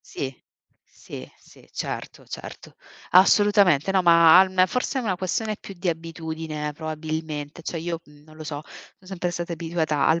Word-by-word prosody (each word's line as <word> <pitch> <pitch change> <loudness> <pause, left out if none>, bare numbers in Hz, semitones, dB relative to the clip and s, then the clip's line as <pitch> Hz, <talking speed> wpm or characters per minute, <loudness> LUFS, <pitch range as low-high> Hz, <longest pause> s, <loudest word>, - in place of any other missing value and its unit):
Sì, 135 -1 -6 0.5
sì, 65 - -11
sì, - - -20
certo, - - -5
certo. - - -9 0.4
Assolutamente 195 -3 +5
no, 190 -1 +3
ma 170 -1 +8
al 185 -1 +5
forse 250 +6 -1
è - - -1
una 195 -6 -1
questione 210 +3 -2
più 195 - -9
di 180 +1 -3
abitudine 160 -2 -4
probabilmente. 155 0 -5
Cioè 165 - -4
io, 165 0 -3
mhmm, 145 0 -19
non 155 0 -17
lo 155 - -8
so, 150 -1 -5 0.4
son 185 - -18
sempre 180 -2 -2
stata 175 0 -4
abituata 160 -3 -1
al 160 +1 +3
165 Hz, 165 wpm, -24 LUFS, 155-185 Hz, 0.5 s, ma